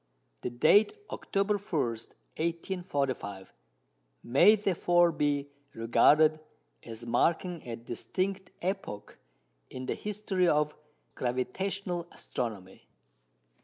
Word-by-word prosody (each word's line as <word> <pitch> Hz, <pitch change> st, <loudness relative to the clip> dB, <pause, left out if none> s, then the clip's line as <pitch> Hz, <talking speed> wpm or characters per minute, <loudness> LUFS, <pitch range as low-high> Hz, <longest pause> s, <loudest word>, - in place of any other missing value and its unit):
The -, -, -2 dB
date 155 Hz, -, +4 dB, 0.2 s
October 200 Hz, +1 st, 0 dB
21, 190 Hz, -7 st, -1 dB, 0.5 s
1845, 145 Hz, -, -3 dB, 0.7 s
"may 140 Hz, -, +6 dB
therefore 175 Hz, -4 st, +3 dB
be 145 Hz, -2 st, -1 dB, 0.2 s
regarded 150 Hz, +7 st, +4 dB, 0.4 s
as 115 Hz, 0 st, -8 dB
marking 170 Hz, +7 st, +1 dB
a 115 Hz, -, -3 dB
distinct 185 Hz, -, -3 dB
epoch 185 Hz, -, -4 dB, 0.5 s
in 130 Hz, 0 st, -6 dB
the -, -, -1 dB
history 205 Hz, -3 st, -1 dB
of 150 Hz, -1 st, +2 dB, 0.4 s
gravitational 175 Hz, +8 st, -2 dB
astronomy." 100 Hz, -6 st, -6 dB
160 Hz, 90 wpm, -30 LUFS, 125-190 Hz, 0.7 s, may